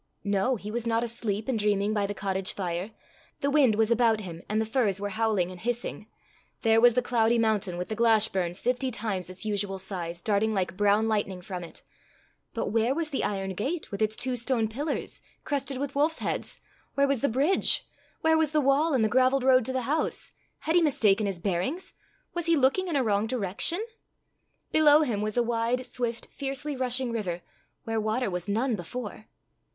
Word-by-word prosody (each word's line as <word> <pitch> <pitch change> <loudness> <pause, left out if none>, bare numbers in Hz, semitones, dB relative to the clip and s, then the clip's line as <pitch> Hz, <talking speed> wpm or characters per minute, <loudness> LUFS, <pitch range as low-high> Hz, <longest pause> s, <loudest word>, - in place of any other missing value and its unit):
No; 200 +5 +1
he 210 -1 -7
was 235 +1 -3
not 230 0 +1
asleep 220 -3 -2
and 250 -4 0
dreaming 205 0 +1
by 205 -2 0
the 205 - -4
cottage 190 -1 -1
fire; 180 +1 -3 0.5
the 280 0 +1
wind 275 -7 +4
was 220 +1 +2
about 230 -2 +3
him, 170 -4 -8
and 215 +1 +1
the 220 - +1
firs 215 -4 +1
were 205 0 -3
howling 210 -4 0
and 180 - -10
hissing; 235 -1 -3 0.6
there 225 -1 +4
was 240 -1 +6
the 250 - +2
cloudy 235 -1 +2
mountain, 215 -5 +1
with 180 - -3
the 220 - -2
Glashburn, 215 -6 +2
fifty 250 +6 -1
times 210 -6 -3
its 185 +4 -4
usual 205 -2 -2
size, 180 -3 -4
darting 215 +3 +1
like 185 -2 -1
brown 205 +2 +3
lightning 205 -4 -1
from 180 -1 -6
it; 170 - -11 0.7
but - - -1
where 230 +4 +1
was 320 -1 -2
the 275 - -1
iron 195 -1 -2
gate 280 - -3
with 200 - -5
its 215 0 +1
two 250 +2 -1
stone 240 -2 +1
pillars, 285 +7 -4 0.2
crested 275 -2 -2
with 280 +1 -3
wolf's 305 +3 +2
heads? - - -2 0.4
where 280 0 +3
was 275 -3 0
the 280 - +2
bridge? 280 +11 +2 0.3
where 320 0 +4
was 315 -1 +1
the 305 - +4
wall, 285 +2 +3
and 240 - +3
the - - +4
gravelled 260 +3 +3
road 255 -1 +5
to 260 - -2
the 260 0 -1
house? 300 +6 -1 0.3
Had 320 - 0
he 350 - +6
mistaken 215 -9 +3
his 195 -2 -2
bearings? 195 - -2 0.4
was 345 -1 -1
he 335 -1 +4
looking 280 +8 +2
in 335 - -2
a 270 - +3
wrong 210 -1 +1
direction? 250 - -1 0.9
Below 305 -1 +6
him 225 -8 -1
was 215 +2 -2
a 240 - +4
wide, 235 +2 0
swift, 240 -2 -3
fiercely 275 +2 -3
rushing 255 -1 -1
river, 185 -7 -3 0.4
where 225 -1 -1
water 220 +1 -1
was 180 +2 -4
none 230 +4 +1
before! 215 +3 -7
225 Hz, 200 wpm, -27 LUFS, 205-260 Hz, 0.9 s, was